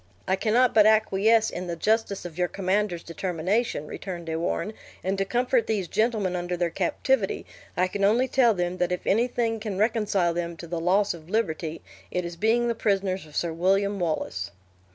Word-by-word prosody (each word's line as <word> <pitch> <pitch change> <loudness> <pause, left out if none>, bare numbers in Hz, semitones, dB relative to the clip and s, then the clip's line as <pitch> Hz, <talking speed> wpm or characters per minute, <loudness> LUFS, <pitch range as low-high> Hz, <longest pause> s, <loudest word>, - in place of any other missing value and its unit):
"I 190 - +3
cannot 235 +5 +3
but 215 -1 +6
acquiesce 220 +1 +3
in 180 +1 -5
the 170 - -3
justice 210 +1 0
of 170 -3 -7
your 180 0 +1
commander's 190 -1 -1
determination," 180 +2 -1
returned 175 +2 -6
De 160 -1 -3
Warenne, 175 +6 -2 0.3
"and 190 +1 0
to 195 - +1
comfort 245 +3 +1
these 200 -5 -1
gentlemen 215 -3 0
under 175 0 -2
their 175 -1 0
captivity, 195 +5 0 0.3
I 180 +1 +3
can 200 +2 -3
only 230 +6 +4
tell 240 -4 +4
them 175 0 -2
that 180 0 +1
if 180 - -3
anything 230 +1 +1
can 210 -3 -4
reconcile 205 -5 +1
them 170 0 -3
to 170 - -8
the 170 0 -3
loss 195 +4 +2
of 165 -1 -12
liberty, 165 -6 -2 0.3
it 180 -1 -2
is 170 0 -6
being 225 +6 +2
the 235 - +1
prisoners 195 -5 -1
of 150 - -15
Sir 170 -2 -1
William 195 +4 +1
Wallace." 155 - -2
190 Hz, 190 wpm, -26 LUFS, 175-220 Hz, 0.3 s, but